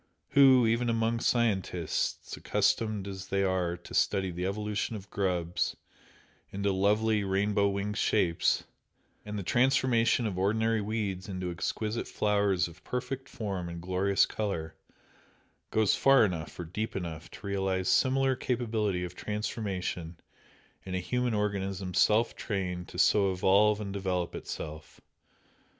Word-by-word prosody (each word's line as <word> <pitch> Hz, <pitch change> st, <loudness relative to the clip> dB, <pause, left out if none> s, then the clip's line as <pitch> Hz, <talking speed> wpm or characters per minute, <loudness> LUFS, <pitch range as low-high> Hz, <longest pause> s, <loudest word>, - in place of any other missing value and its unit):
Who, 130 Hz, -3 st, +6 dB
even 115 Hz, +2 st, +1 dB
among 115 Hz, 0 st, +1 dB
scientists, 95 Hz, -10 st, 0 dB
accustomed 110 Hz, -3 st, 0 dB
as 95 Hz, -1 st, -7 dB
they 100 Hz, 0 st, +1 dB
are 90 Hz, -2 st, 0 dB
to 85 Hz, -, -13 dB
study 95 Hz, -2 st, +1 dB
the 90 Hz, +2 st, -3 dB
evolution 105 Hz, +2 st, -2 dB
of 100 Hz, -1 st, -10 dB
grubs 90 Hz, -3 st, -1 dB, 0.7 s
into 100 Hz, +1 st, 0 dB
lovely 105 Hz, +2 st, +2 dB
rainbow 100 Hz, +1 st, +1 dB
winged 100 Hz, +1 st, -2 dB
shapes, 85 Hz, -6 st, +2 dB, 0.6 s
and 105 Hz, 0 st, -4 dB
the 100 Hz, -, -3 dB
transformation 120 Hz, 0 st, +3 dB
of 95 Hz, -4 st, -2 dB
ordinary 110 Hz, +3 st, +1 dB
weeds 100 Hz, -3 st, -3 dB
into 90 Hz, -2 st, -3 dB
exquisite 110 Hz, +6 st, -3 dB
flowers 100 Hz, -4 st, +1 dB
of 85 Hz, 0 st, -15 dB
perfect 130 Hz, +2 st, -4 dB
form 95 Hz, -5 st, -4 dB
and 85 Hz, 0 st, -6 dB
glorious 95 Hz, +3 st, +2 dB
colour, 85 Hz, -7 st, -3 dB, 1.0 s
goes 110 Hz, -2 st, +3 dB
far 135 Hz, -4 st, +5 dB
enough 85 Hz, -5 st, -4 dB
or 90 Hz, -, -4 dB
deep 105 Hz, +7 st, -4 dB
enough 85 Hz, -3 st, -5 dB
to -, -, -12 dB
realise 95 Hz, -2 st, -1 dB
similar 135 Hz, 0 st, +3 dB
capability 110 Hz, -7 st, -1 dB
of 90 Hz, -1 st, -5 dB
transformation 95 Hz, -5 st, -4 dB, 0.7 s
in 95 Hz, -1 st, -5 dB
a -, -, 0 dB
human 125 Hz, +5 st, -1 dB
organism 100 Hz, -2 st, -2 dB
self 110 Hz, +6 st, +3 dB
trained 90 Hz, -4 st, -3 dB
to -, -, -10 dB
so 100 Hz, -2 st, +4 dB
evolve 100 Hz, +3 st, +3 dB
and 100 Hz, -2 st, -5 dB
develop 95 Hz, -3 st, -2 dB
itself? 75 Hz, 0 st, -7 dB
100 Hz, 135 wpm, -29 LUFS, 90-110 Hz, 1.0 s, Who